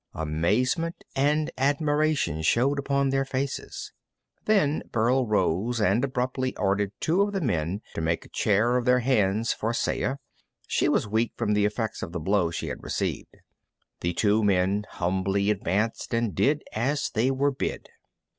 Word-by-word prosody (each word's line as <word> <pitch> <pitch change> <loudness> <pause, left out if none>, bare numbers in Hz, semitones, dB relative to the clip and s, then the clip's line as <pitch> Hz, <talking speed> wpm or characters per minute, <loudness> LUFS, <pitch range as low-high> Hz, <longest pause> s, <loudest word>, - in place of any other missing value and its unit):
Amazement 105 - 0
and 150 +3 +1
admiration 145 - +1
showed 130 - +2
upon 140 0 +1
their 135 0 +1
faces. 135 0 -4 0.5
Then 190 -9 +2
Burl 120 +3 +2
rose 105 +3 +1
and 105 +4 +2
abruptly 130 0 -1
ordered 100 0 +1
two 170 +5 +2
of 205 0 +1
the 195 - 0
men 95 - -1
to - - -3
make 80 +1 -1
a - - -16
chair 110 +4 +2
of 125 - -1
their 125 0 +4
hands 110 -3 +2
for 115 +2 -2
Saya. 130 - 0 0.5
She - - +1
was - - +1
weak 110 +2 0
from 105 - 0
the 105 0 +3
effects 110 +1 -2
of 85 - -6
the 90 - -2
blow 90 +1 +1
she 85 - -4
had - - -6
received. - - -3 0.6
The 85 +1 -1
two 105 +3 +2
men 100 +1 +1
humbly 95 +3 0
advanced 105 +4 -1
and 115 -4 0
did 145 - +1
as 135 +7 -1
they 115 +3 +2
were 140 +2 +1
bid. 130 - -4
115 Hz, 160 wpm, -26 LUFS, 100-135 Hz, 0.6 s, their